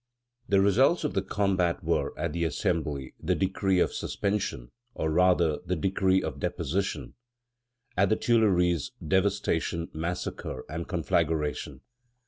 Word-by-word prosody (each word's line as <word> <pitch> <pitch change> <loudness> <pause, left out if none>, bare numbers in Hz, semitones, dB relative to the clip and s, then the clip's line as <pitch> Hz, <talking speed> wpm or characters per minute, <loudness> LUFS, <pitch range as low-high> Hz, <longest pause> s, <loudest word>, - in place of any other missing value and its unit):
The 100 -1 +4
results 130 - +4
of 150 - -1
the 95 - +1
combat 95 -3 0
were, - - 0
at - - -2
the 85 0 -1
Assembly, 75 -3 -1
the - - 0
decree 95 0 +1
of - - +2
suspension, 100 -12 -2 0.2
or, 80 - -1
rather, 85 -2 +3
the 90 - -1
decree 95 +2 +2
of - - -4
deposition; 95 +7 -2 0.8
at 95 +1 +3
the 110 - +4
Tuileries, 90 - +2
devastation, 95 -2 0
massacre, 80 -5 -4
and 80 +2 -5
conflagration. 75 -5 -1
90 Hz, 125 wpm, -28 LUFS, 80-100 Hz, 0.8 s, The